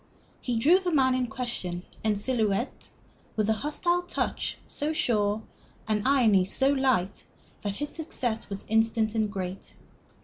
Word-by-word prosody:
He 245 - -2
drew 320 +11 +5
the 365 -2 -2
man 265 -4 +4
in 255 -1 0
question, 220 -8 -4 0.2
en 215 -1 +2
silhouette, 220 0 -1 0.5
with 215 -2 +1
a - - +5
hostile 325 +8 0
touch 355 - -2
so 300 +2 -2
sure, 215 -6 +1 0.4
an 215 +2 0
irony 230 -9 +5
so 265 +8 +2
light, 260 -9 +1 0.4
that 205 -1 -2
his 295 +4 -3
success 255 -8 -1
was 195 -1 -4
instant 225 0 +2
and 215 -2 0
great. 190 -1 -6
225 Hz, 145 wpm, -27 LUFS, 210-270 Hz, 0.5 s, drew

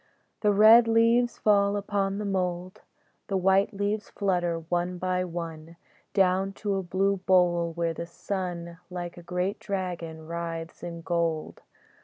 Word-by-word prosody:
The 210 - +3
red 220 +3 +7
leaves 230 +2 +3
fall 200 -1 +3
upon 200 -1 -1
the 210 - -3
mould, 185 -2 -2 0.5
The 195 - 0
white 190 +2 +3
leaves 205 +1 -2
flutter, 175 -4 -1
one 175 +1 -1
by 185 0 0
one, 165 -2 -6 0.4
Down 190 0 +2
to 205 0 -2
a 195 - 0
blue 195 +2 0
bowl 175 -2 +2
where 170 0 -1
the 170 +1 -6
sun, 175 -2 -5
Like 175 -1 -5
a 175 - -10
great 180 +3 -2
dragon, 175 -5 -4
writhes 165 0 -5
in 170 -1 -6
gold. 165 -2 -2
180 Hz, 145 wpm, -27 LUFS, 170-200 Hz, 0.5 s, red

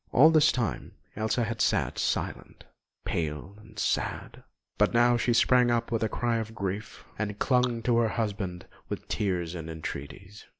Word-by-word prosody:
All 155 +6 +7
this 155 0 +5
time 120 -6 -3 0.2
Elsa 110 +3 0
had 115 0 -3
sat - - +1
silent, - - -3 0.4
pale 80 +3 -3
and 110 +1 -17
sad; - - -2 0.4
but - - +3
now 120 +1 +5
she 120 +1 +1
sprang 125 +1 +4
up 120 0 0
with 115 - 0
a 110 - +1
cry 120 +1 0
of 110 0 -5
grief, 100 +1 -5
and 105 -1 -2
clung 125 -2 +1
to 120 0 +2
her 115 -1 +3
husband 100 -5 -3 0.2
with - - -5
tears 90 -5 -1
and 80 -2 -6
entreaties. 80 +5 -8
110 Hz, 165 wpm, -28 LUFS, 95-120 Hz, 0.4 s, All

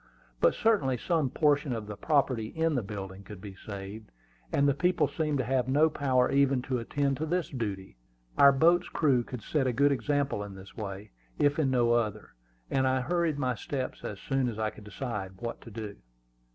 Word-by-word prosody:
But - - +4
certainly 170 - +2
some 160 -1 0
portion 145 -1 +2
of 110 -2 -4
the 105 0 -6
property 130 -3 +1
in 160 +5 0
the 130 - +1
building 100 -2 -7
could 100 0 -10
be 100 0 -8
saved, 100 +2 -8 0.4
and 140 - +3
the 140 - +4
people 175 +6 +2
seemed 155 -3 -1
to 130 - 0
have 130 0 0
no 150 +4 +4
power 130 -4 +2
even 135 -2 +3
to 130 -2 -1
attend 140 +3 -1
to 155 - -2
this 175 +1 0
duty. 100 - -5 0.4
Our 140 - +8
boat's 170 +6 +3
crew 140 -6 +2
could 120 -2 -8
set 140 0 0
a 125 - +1
good 140 +4 +4
example 140 -2 0
in 100 -1 -8
this 95 0 -12
way, 100 -1 -6 0.3
if 145 +1 +2
in 145 -4 +2
no 120 -2 +3
other; 110 -3 -1 0.4
and 130 -1 +2
I 130 0 +2
hurried 170 +1 0
my 130 -3 0
steps 130 +3 -4
as 105 - -5
soon 135 0 0
as 110 - -6
I 110 -1 -1
could 105 - -14
decide 105 -3 -5
what 115 +3 -5
to - - -11
do. 105 -2 -7
130 Hz, 205 wpm, -29 LUFS, 110-145 Hz, 0.4 s, Our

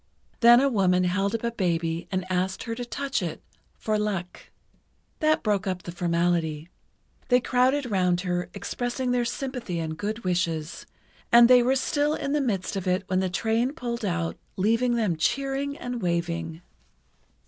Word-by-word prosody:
Then 240 0 +8
a 275 - +3
woman 185 -7 +2
held 195 +4 0
up 230 - -4
a 235 - 0
baby 170 -5 -1
and 185 -1 -1
asked 185 +1 -1
her 230 - -4
to 245 +2 -5
touch 270 0 -2
it 170 -4 -4 0.4
"for 215 -1 -1
luck." 195 -4 -4 0.7
That 310 -1 +2
broke 205 -2 0
up 185 -1 -3
the 175 - -6
formality. 170 -2 0 0.6
They 250 -1 +5
crowded 255 +3 +2
round 180 -2 +2
her, 180 -1 -2
expressing 245 +5 -3
their 245 -1 +1
sympathy 245 -6 -4
and 160 -1 -3
good 210 +6 -4
wishes, 170 -3 -2 0.4
and 235 0 +8
they 250 0 +7
were 255 +2 +2
still 290 +3 +1
in 280 - -3
the 295 0 +1
midst 205 -7 -2
of 190 -1 -3
it 185 +2 +1
when 185 - +2
the 190 -1 0
train 225 +7 0
pulled 240 -5 -4
out 175 -4 -2 0.2
leaving 230 +5 +2
them 210 -8 0
cheering 275 - -1
and 245 -1 -5
waving. 170 -1 -2
200 Hz, 170 wpm, -26 LUFS, 180-245 Hz, 0.7 s, Then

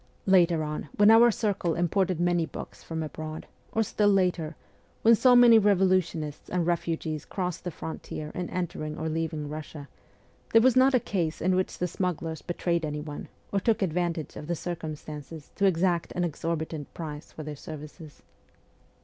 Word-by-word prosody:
Later 175 -4 +4
on, 150 -1 -4
when 205 +1 +6
our 235 +2 +8
circle 200 -7 0
imported 175 +1 +1
many 175 -1 +2
books - - -9
from 160 -1 -4
abroad, 155 0 -6 0.3
or 225 - +2
still 210 0 +2
later, 180 -5 +1 0.5
when 230 - +7
so 250 +2 +5
many 240 -2 +8
revolutionists 185 -7 +1
and 175 -2 0
refugees 165 -3 -1
crossed 180 -3 -4
the 180 - -3
frontier 155 -1 -6
in 180 -1 -4
entering 155 -4 -4
or 160 - -3
leaving 160 -2 -2
Russia, 150 -1 -7 0.7
there 225 - +8
was 260 -2 +5
not 260 +1 +5
a - - +5
case 170 -8 -2
in 185 +2 +2
which 185 0 -1
the 180 - -1
smugglers 165 -3 -3
betrayed 170 -1 -1
anyone, 150 -1 -5 0.2
or 200 - +1
took 215 0 +1
advantage 170 -2 -2
of 150 - -8
the 170 - -1
circumstances 155 -2 -7
to 200 - +3
exact 175 -1 +1
an 180 - -1
exorbitant 160 -2 -3
price 150 -3 -7
for 155 - -8
their 150 0 -6
services. 150 +1 -10
170 Hz, 165 wpm, -27 LUFS, 155-185 Hz, 0.7 s, our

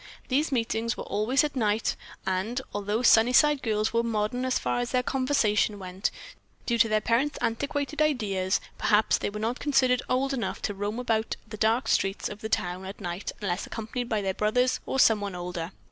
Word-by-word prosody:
These 290 +4 +1
meetings 230 -1 -1
were - - -4
always 225 +8 +1
at 295 -2 -2
night, 215 -3 +1 0.3
and, 190 +7 -1
although 205 +3 -1
Sunnyside 255 +6 +5
girls 215 -1 0
were 230 - +3
modern 230 +2 -1
as 255 - +1
far - - -1
as 245 0 -2
their 250 -1 +1
conversation 240 -6 +1
went; 185 0 -3 0.6
due 235 -1 0
to 225 -1 +5
their 215 0 +3
parents' 265 +7 +1
antiquaited 285 +5 -2
ideas, 205 -11 +1 0.2
perhaps, 210 0 +3
they - - -1
were 210 +1 -6
not 230 +4 -2
considered 255 -3 +2
old 270 +2 +1
enough 245 -4 -2
to 205 - -1
roam 205 +3 -3
about 225 -3 0
the 215 - -7
dark 225 +2 +1
streets 195 -2 +1
of 205 - -9
the 220 - -4
town 180 -2 -1
at 190 +1 -8
night 180 0 -4
unless 185 -2 -2
accompanied 235 +2 -4
by 215 -2 0
their 190 -1 0
brothers 250 +6 +1
or 265 - -1
someone 205 -5 +3
older. 175 -1 -5
225 Hz, 190 wpm, -27 LUFS, 205-250 Hz, 0.6 s, Sunnyside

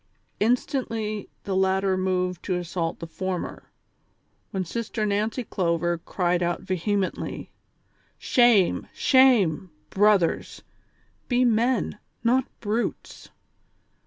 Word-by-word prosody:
" - - -43
Instantly 225 -5 -1
the 195 - -2
latter 190 0 +2
moved 185 -1 -1
to 185 - -2
assault 170 -1 -3
the - - -7
former, 185 +2 -5 0.8
when 190 -3 -3
Sister 225 +3 -3
Xancy 215 +4 -1
Clover 170 -1 0
cried 175 0 -1
out 175 0 -1
vehemently: 190 +1 -2 0.3
" - - -40 0.2
Shame! 240 -7 +4
shame! 225 - +4 0.2
brothers; 200 -4 +2 0.6
be 250 0 +2
men, 235 -1 +1 0.2
not 250 +2 +3 0.2
brutes 225 +2 -3
195 Hz, 100 wpm, -25 LUFS, 180-230 Hz, 0.8 s, Shame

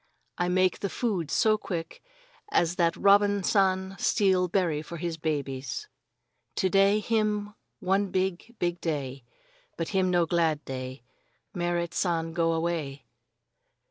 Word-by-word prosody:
"I 175 0 +1
make 185 0 +2
the 200 - -2
food 190 - -2
so 215 -1 +3
quick 165 -5 -5 0.5
as 175 +1 +2
that 170 -1 +2
Robin 200 0 +4
San 190 -1 +2
steal 190 -4 +3
berry 170 -5 0
for 170 +2 -8
his 170 0 -3
babies. 140 -4 -3 0.7
To 190 - +1
day 195 +2 +4
him 210 -1 0 0.3
one 195 +2 +1
big, 190 +5 -2
big 175 0 -1
day, 140 -5 -3 0.5
but 165 - -2
him 190 -2 +1
no 175 -1 +3
glad 160 -2 +1
day. 130 -1 -6 0.5
Merrit 175 -2 -1
San 165 -2 0
go 165 -1 +2
away." 160 -5 -2
175 Hz, 135 wpm, -28 LUFS, 165-195 Hz, 0.7 s, Robin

